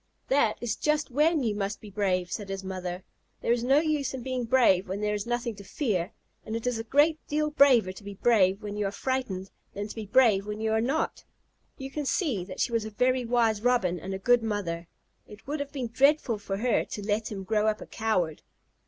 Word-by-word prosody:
"That 260 -6 +3
is 235 -3 -2
just 300 -2 0
when 300 +3 +3
you 220 -3 +1
must 205 0 -3
be 210 - -11
brave," 185 -3 0
said 205 -2 -4
his 195 0 -4
mother. 185 -1 -5 0.4
"There - - 0
is 240 0 +1
no 270 +4 +5
use 300 -4 -1
in 255 - -6
being 255 -1 -2
brave 215 -7 +3
when 195 +2 -3
there 210 0 0
is 210 +1 -3
nothing 240 -1 -1
to 200 - -10
fear, 195 - -1 0.3
and 220 - -5
it 230 - -4
is 245 -2 0
a - - -3
great 295 +7 +3
deal 300 0 0
braver 255 -10 +5
to 190 - -12
be 200 0 -8
brave 200 -2 +3
when 205 -1 -5
you 210 -1 0
are - - -3
frightened 210 -7 -3 0.2
than 205 +1 -3
to - - -8
be 220 -2 -7
brave 210 -4 +4
when 210 0 -4
you 220 0 0
are 220 0 +2
not." 275 +7 -1 0.5
You 270 -1 -7
can 295 -1 -3
see 265 - 0
that - - -9
she - - +1
was 230 -2 +1
a 220 - -5
very 250 +3 +1
wise 230 -3 +2
Robin 215 -8 +2
and 190 +4 -5
a - - -3
good 245 +5 +3
mother. 185 -6 -3 0.4
It 210 0 -13
would 295 +2 -3
have 285 0 -4
been 260 -5 -4
dreadful 260 -1 +3
for 195 -1 -4
her 235 +1 +1
to 205 - -7
let 210 +1 -1
him 195 -2 -5
grow 215 +2 +1
up 215 0 +1
a - - -8
coward. 185 -8 -1
220 Hz, 235 wpm, -28 LUFS, 200-255 Hz, 0.5 s, no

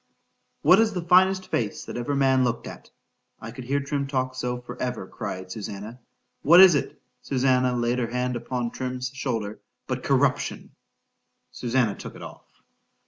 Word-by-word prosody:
— - - -48
—What 190 - +7
is 225 -1 +3
the 180 -3 -3
finest 185 +2 +3
face 110 -4 -2
that - - -7
ever 120 +4 -2
man 135 -1 +3
looked 125 -1 -1
at!—I 115 - -13
could 125 +1 -9
hear 140 +3 0
Trim 140 0 -2
talk 130 -2 -1
so 125 -1 -3
for 125 0 -9
ever, 125 -6 -3
cried 95 0 -6
Susannah,—what 115 - 0
is 190 -2 +9
it! 140 - -2 0.2
(Susannah 130 -1 +1
laid 120 +1 0
her 120 - -1
hand 125 +1 -1
upon 120 0 -3
Trim's 125 -1 -4
shoulder)—but 115 -6 -5
corruption?——Susannah 120 -3 -2
took - - -8
it - - -10
off. - - -14
125 Hz, 150 wpm, -25 LUFS, 120-140 Hz, 0.2 s, is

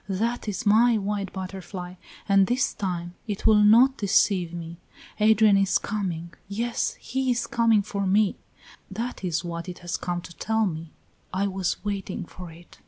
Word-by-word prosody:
"That 225 +5 -1
is 205 0 -3
my 225 +3 +5
white 200 -1 -2
butterfly, 185 -1 -7 0.3
and 195 -1 +5
this 250 +1 +1
time 175 -3 -4
it 205 -2 -4
will 215 -1 +6
not 235 +6 +6
deceive 190 -3 +2
me. 170 -1 -7 0.4
Adrian 215 -1 +5
is 195 -1 +3
coming 175 -5 -4
yes, 230 +4 -2
he 265 +1 -2
is 240 -1 +1
coming 230 -3 +3
for 200 -1 -3
me; 200 +1 +3 0.5
that 230 +3 -5
is 170 -2 -1
what 170 +1 -5
it 180 - -7
has 175 - -2
come 175 -1 -3
to 170 - -12
tell 220 +4 0
me 165 -3 -4 0.4
I 190 +2 0
was 190 0 -2
waiting 195 -3 -3
for 180 0 -10
it." 170 +1 -16
195 Hz, 170 wpm, -25 LUFS, 180-220 Hz, 0.5 s, will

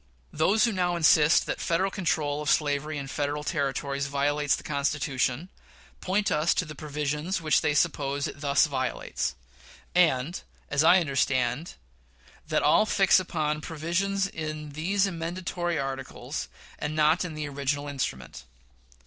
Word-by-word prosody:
Those 190 +8 +3
who 235 - +3
now 180 -3 0
insist 160 -1 +5
that - - -3
Federal 185 +4 +1
control 150 -6 -1
of 150 - -2
slavery 150 +1 +1
in 140 - -4
Federal 145 +2 -2
Territories 140 -2 -2
violates 145 +1 +1
the - - -9
Constitution, 140 +1 -1 0.5
point 200 +2 0
us 155 +3 +2
to 180 - 0
the 155 - -8
provisions 150 +4 -3
which 155 -3 +2
they 150 - +1
suppose 145 -3 0
it 140 - -9
thus 140 +1 +3
violates; 130 -4 -2 0.6
and, 165 -2 +2 0.3
as 140 +2 +3
I 175 +3 +7
understand, 135 -1 0 0.7
they - - 0
all 215 - +4
fix 195 -2 +4
upon 155 -4 -2
provisions 175 +5 -1
in 155 -4 -5
these 185 +7 +1
amendatory 175 -1 -3
articles, 135 -1 -4 0.3
and 150 +1 -3
not 155 +3 +3
in 170 -4 -5
the 150 -1 -4
original 145 +1 -2
instrument. 65 - -5
150 Hz, 140 wpm, -27 LUFS, 140-175 Hz, 0.7 s, I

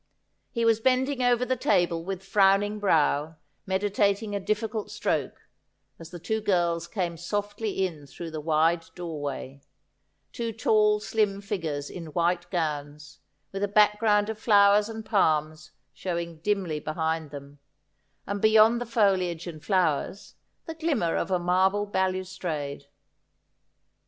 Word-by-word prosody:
He 235 -3 -1
was 225 -1 +4
bending 260 +2 +1
over 245 0 +2
the 255 - 0
table 170 -7 +1
with 190 +1 -5
frowning 200 +1 +3
brow, 160 -5 +1 0.3
meditat 200 +2 +1
ing 210 -2 -5
a - - -1
difficult 215 +2 -2
stroke, - - -2 0.5
as 165 -1 -10
the 175 - -8
two 220 +6 -2
girls 170 -4 0
came 175 -3 -3
softly 205 +2 -2
in 155 -6 -7
through 165 +3 -8
the 155 -1 -5
wide 165 +2 +2
doorway 145 -5 -6 0.3
— - - -48
two 230 -1 -3
tall 210 -1 +3
slim 210 -2 0
figures 165 -9 -4
in 170 -3 -8
white 175 0 0
gowns, 150 -4 -4 0.3
with 195 +1 -4
a - - +2
back 210 +1 +4
ground 210 -2 +3
of 220 -1 -5
flowers 205 -1 +5
and 220 -1 -7
palms 155 -6 +1 0.2
showing 170 -2 -4
dimly 185 -4 -1
behind 160 0 -2
them, 140 0 -11 0.7
and 200 0 -4
beyond 220 +2 +5
the 245 - -4
foliage 190 -7 +1
and 160 -4 -8
flowers, 185 -1 0 0.3
the 325 - -5
glimmer 300 - 0
of - - -1
a 185 - +2
marble 190 +3 +2
balustrade. 185 -7 -3
190 Hz, 140 wpm, -26 LUFS, 165-210 Hz, 0.7 s, flowers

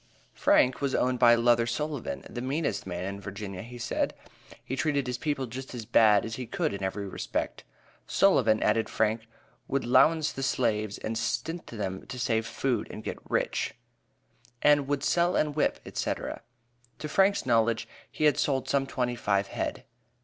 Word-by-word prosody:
Frank 125 +2 +3
was 140 -2 0
owned 125 0 +1
by 120 -1 +7
Luther 120 0 +3
Sullivan, 145 +2 -3
"the 120 - -6
meanest 140 -2 -2
man 90 -1 -4
in 100 +1 -5
Virginia," 100 -1 -6
he 120 +2 -9
said; 120 - -1 0.5
he 130 - -3
treated 140 0 0
his 125 -1 -3
people 145 -3 -1
just 130 +2 -7
as 115 -3 -6
bad 105 -3 +5
as 110 0 -5
he 125 -2 -5
could - - -1
in 100 - -5
every 100 +1 -3
respect. - - -3 0.4
"Sullivan," 115 - +4
added 110 +1 +2
Frank, 110 +1 0 0.4
"would 140 - 0
'lowance 150 +6 +4
the 135 - -5
slaves 110 -6 0
and 110 0 -3
stint 160 +8 -2
them 95 -4 -5
to 125 - -6
save 115 -2 0
food 125 -5 -1
and 110 - -8
get - - -5
rich," - - -1 0.9
and 145 -2 +5
"would 145 -1 -1
sell 175 +3 +2
and 150 -1 +1
whip," 155 - +1
etc. - - -3 0.6
To 150 - -5
Frank's 195 +6 +3
knowledge, 115 -2 +2 0.2
he - - -4
had 150 -1 +4
sold 135 -2 0
some 135 -1 +1
twenty 125 -2 -1
five 100 -3 0
head. - - -3
120 Hz, 170 wpm, -28 LUFS, 110-140 Hz, 0.9 s, by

